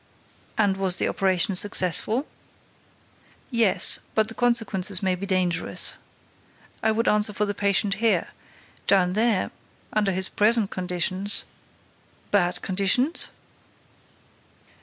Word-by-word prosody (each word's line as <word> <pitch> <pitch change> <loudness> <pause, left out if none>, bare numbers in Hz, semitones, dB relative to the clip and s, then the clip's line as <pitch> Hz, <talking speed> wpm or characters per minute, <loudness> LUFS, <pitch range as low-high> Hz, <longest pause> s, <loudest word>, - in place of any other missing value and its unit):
"And 200 -3 +1
was 190 -2 +1
the - - 0
operation 190 0 +1
successful?" 205 - +1 1.3
"Yes, 230 -5 +4 0.2
but 220 0 +1
the - - -2
consequences 210 -5 0
may 190 -1 +1
be 190 +2 -5
dangerous. 180 -3 -1 0.9
I 220 - +2
would 230 +2 -1
answer 210 0 +3
for 210 +1 -1
the 205 - -3
patient 200 0 +1
here. 230 -1 +1 0.6
Down 180 -2 +3
there—under 215 -1 -1
his 190 +1 0
present 215 -1 +2
conditions—" 185 +2 -2 0.9
"Bad 180 -3 0
conditions?" 200 - 0
200 Hz, 105 wpm, -24 LUFS, 185-215 Hz, 1.3 s, Yes